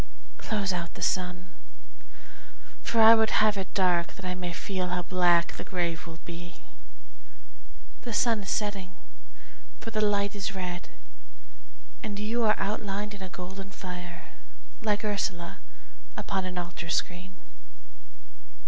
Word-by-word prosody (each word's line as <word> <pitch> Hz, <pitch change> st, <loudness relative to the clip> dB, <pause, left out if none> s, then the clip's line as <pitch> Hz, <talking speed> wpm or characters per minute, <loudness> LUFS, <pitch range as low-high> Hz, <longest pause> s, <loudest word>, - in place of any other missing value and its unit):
Close 200 Hz, -4 st, 0 dB
out 170 Hz, -1 st, -3 dB
the -, -, -8 dB
sun, 180 Hz, -1 st, 0 dB, 1.3 s
for 230 Hz, -, +1 dB
I 225 Hz, +1 st, +12 dB
would 220 Hz, -1 st, +5 dB
have 215 Hz, -1 st, +5 dB
it 190 Hz, -2 st, -3 dB
dark 180 Hz, -3 st, +3 dB
That 195 Hz, -, -9 dB
I 180 Hz, -, 0 dB
may 180 Hz, -1 st, -3 dB
feel 185 Hz, +1 st, -2 dB
how 180 Hz, 0 st, 0 dB
black 175 Hz, -1 st, +4 dB
the -, -, -4 dB
grave 175 Hz, -2 st, -1 dB
will 165 Hz, -1 st, -8 dB
be. 175 Hz, +1 st, -7 dB, 1.5 s
The 240 Hz, -, -5 dB
sun 225 Hz, -1 st, +3 dB
is 195 Hz, -, -5 dB
setting, 200 Hz, -3 st, -1 dB, 0.9 s
for 225 Hz, -, -5 dB
the 215 Hz, -1 st, +1 dB
light 205 Hz, -1 st, +3 dB
is 195 Hz, -1 st, -2 dB
red, 180 Hz, -1 st, -4 dB, 1.1 s
And 210 Hz, -4 st, -3 dB
you 225 Hz, +3 st, 0 dB
are 215 Hz, -, +5 dB
outlined 205 Hz, 0 st, -1 dB
in 200 Hz, -, -9 dB
a 190 Hz, -, -5 dB
golden 190 Hz, +2 st, -7 dB
fire, 180 Hz, -3 st, -7 dB, 0.5 s
Like 210 Hz, -1 st, +1 dB
Ursula 185 Hz, -4 st, -1 dB, 0.6 s
upon 190 Hz, -1 st, -1 dB
an 180 Hz, -1 st, -4 dB
altar 175 Hz, -1 st, -4 dB
screen. 180 Hz, +3 st, -1 dB
190 Hz, 140 wpm, -29 LUFS, 180-205 Hz, 1.5 s, I